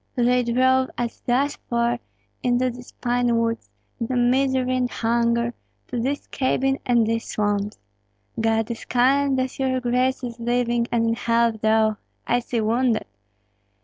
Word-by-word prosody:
They 250 Hz, 0 st, +3 dB
drove 260 Hz, +2 st, +2 dB
us 240 Hz, -1 st, -3 dB
thus 270 Hz, +4 st, +1 dB
far 235 Hz, 0 st, +1 dB, 0.4 s
into 250 Hz, 0 st, +1 dB
these 245 Hz, +1 st, -12 dB
pine 245 Hz, -1 st, 0 dB
woods, 230 Hz, 0 st, -1 dB, 0.3 s
into 235 Hz, +2 st, -2 dB
misery 255 Hz, +1 st, +2 dB
and 250 Hz, -1 st, 0 dB
hunger, 235 Hz, +1 st, 0 dB, 0.4 s
to 245 Hz, -, -2 dB
this 275 Hz, +5 st, -2 dB
cabin 270 Hz, 0 st, 0 dB
and 240 Hz, -2 st, +4 dB
these 230 Hz, +1 st, -1 dB
swamps. 205 Hz, -1 st, -1 dB, 0.6 s
God 225 Hz, 0 st, +1 dB
is 230 Hz, -, -6 dB
kind 270 Hz, +2 st, +2 dB
that 260 Hz, +1 st, -2 dB
your 260 Hz, -1 st, +1 dB
grace 255 Hz, +2 st, 0 dB
is 235 Hz, -1 st, -6 dB
living 240 Hz, 0 st, 0 dB
and 230 Hz, -1 st, +2 dB
in 230 Hz, -, +2 dB
health, 230 Hz, -1 st, +1 dB
though, 220 Hz, -1 st, +3 dB, 0.3 s
I 240 Hz, -, +2 dB
see, 235 Hz, -1 st, -2 dB
wounded. 230 Hz, +1 st, +1 dB
240 Hz, 145 wpm, -23 LUFS, 230-255 Hz, 0.6 s, and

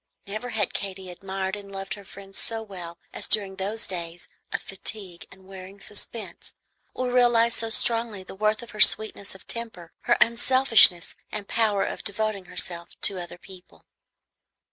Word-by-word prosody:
Never 215 Hz, +5 st, -5 dB
had 215 Hz, -5 st, -1 dB
Katy 190 Hz, -2 st, -5 dB
admired 190 Hz, +1 st, -4 dB
and 200 Hz, -1 st, -11 dB
loved 195 Hz, 0 st, -5 dB
her 200 Hz, -, -10 dB
friend 195 Hz, 0 st, -13 dB
so 225 Hz, -1 st, -3 dB
well 175 Hz, -5 st, -9 dB, 0.2 s
as -, -, -6 dB
during 195 Hz, -3 st, +5 dB
those 210 Hz, +4 st, 0 dB
days 170 Hz, -1 st, -7 dB, 0.2 s
of -, -, -1 dB
fatigue 190 Hz, -3 st, -6 dB
and 190 Hz, 0 st, -17 dB
wearing 190 Hz, +1 st, -11 dB
suspense, 215 Hz, +2 st, -6 dB, 0.4 s
or 255 Hz, -1 st, -2 dB
realized 240 Hz, -2 st, +3 dB
so 225 Hz, -, -2 dB
strongly 230 Hz, -3 st, +1 dB
the -, -, -11 dB
worth 215 Hz, +3 st, 0 dB
of 235 Hz, -, -11 dB
her 215 Hz, -, -4 dB
sweetness 205 Hz, -2 st, +5 dB
of 195 Hz, -, -16 dB
temper, 220 Hz, -8 st, -7 dB
her -, -, +3 dB
unselfishness 235 Hz, -6 st, +5 dB, 0.2 s
and 205 Hz, -2 st, -6 dB
power 215 Hz, -3 st, +1 dB
of -, -, -6 dB
devoting 210 Hz, -2 st, -2 dB
herself 175 Hz, -1 st, +1 dB
to 195 Hz, -2 st, +5 dB
other 175 Hz, 0 st, -9 dB
people. 185 Hz, 0 st, -16 dB
200 Hz, 165 wpm, -25 LUFS, 190-225 Hz, 0.4 s, during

